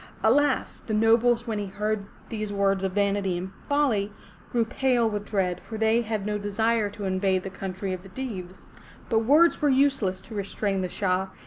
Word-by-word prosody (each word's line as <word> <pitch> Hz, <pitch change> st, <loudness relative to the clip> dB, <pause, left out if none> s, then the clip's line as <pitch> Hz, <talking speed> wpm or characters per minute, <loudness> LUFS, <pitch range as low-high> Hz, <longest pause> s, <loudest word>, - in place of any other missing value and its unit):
Alas! 275 Hz, +5 st, +2 dB
the 215 Hz, -, 0 dB
nobles 230 Hz, +2 st, +4 dB
when 220 Hz, -3 st, -2 dB
they 205 Hz, -, -3 dB
heard 210 Hz, +1 st, -2 dB, 0.2 s
these 215 Hz, -2 st, -3 dB
words 195 Hz, -1 st, +1 dB
of 190 Hz, -1 st, -1 dB
vanity 200 Hz, -2 st, +1 dB
and 185 Hz, +2 st, -5 dB, 0.2 s
folly, 250 Hz, -9 st, +2 dB, 0.4 s
grew 235 Hz, -2 st, +2 dB
pale 245 Hz, 0 st, +2 dB
with 210 Hz, -1 st, -3 dB
dread, 180 Hz, -4 st, 0 dB
for 220 Hz, -, -7 dB
they 220 Hz, +2 st, +3 dB
had 215 Hz, -3 st, -3 dB
no 210 Hz, 0 st, -1 dB
desire 215 Hz, +1 st, +1 dB
to 205 Hz, 0 st, -7 dB
invade 190 Hz, 0 st, +1 dB
the 195 Hz, -, -6 dB
country 190 Hz, 0 st, -4 dB
of 185 Hz, -, -5 dB
the 195 Hz, -, -13 dB
Deevs. 190 Hz, -6 st, -7 dB, 0.4 s
But 225 Hz, -, +3 dB
words 320 Hz, +8 st, +5 dB
were 295 Hz, -, +3 dB
useless 265 Hz, -9 st, +2 dB
to 230 Hz, -, -12 dB
restrain 200 Hz, -1 st, -2 dB
the 185 Hz, -, -2 dB
Shah. 190 Hz, 0 st, 0 dB
210 Hz, 190 wpm, -26 LUFS, 195-230 Hz, 0.4 s, words